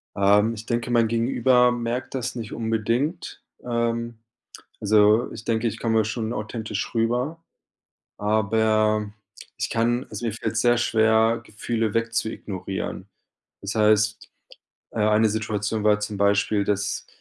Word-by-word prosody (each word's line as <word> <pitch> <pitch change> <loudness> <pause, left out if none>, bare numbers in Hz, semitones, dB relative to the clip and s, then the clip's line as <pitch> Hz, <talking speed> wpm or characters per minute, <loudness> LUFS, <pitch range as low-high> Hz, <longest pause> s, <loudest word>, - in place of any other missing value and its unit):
Ähm, 105 +3 +3
ich 110 0 -8
denke, 120 +1 -2
mein 115 -1 +3
Gegenüber 125 +2 +3
merkt 120 +2 -3
das 125 -1 -3
nicht 115 -3 -6
unbedingt. 115 +8 -2 0.2
Ähm, 115 -1 -2 0.6
also 105 +2 +4
ich 110 - -9
denke, 115 0 0
ich 110 +1 -6
komme 110 -1 +1
schon 110 +1 -3
authentisch 110 -1 -4
rüber, 125 +8 -1 0.7
aber 110 0 +1 0.4
ich - - -3
kann 120 +2 +1
also 120 - -5
mir 115 - -1
fällt's 115 +1 -2
sehr 120 0 +3
schwer, 110 -1 +3
Gefühle 110 0 -2
weg 115 0 0
zu 115 -2 0
ignorieren. 95 -2 -6 0.5
Das 100 +3 -4
heißt, 110 0 +2 0.6
äh - - -6
eine 110 +1 +4
Situation 110 0 -2
war 105 0 +4
zum 105 0 -4
Beispiel, 100 +1 +2
dass 100 0 -2
110 Hz, 135 wpm, -24 LUFS, 105-115 Hz, 0.7 s, also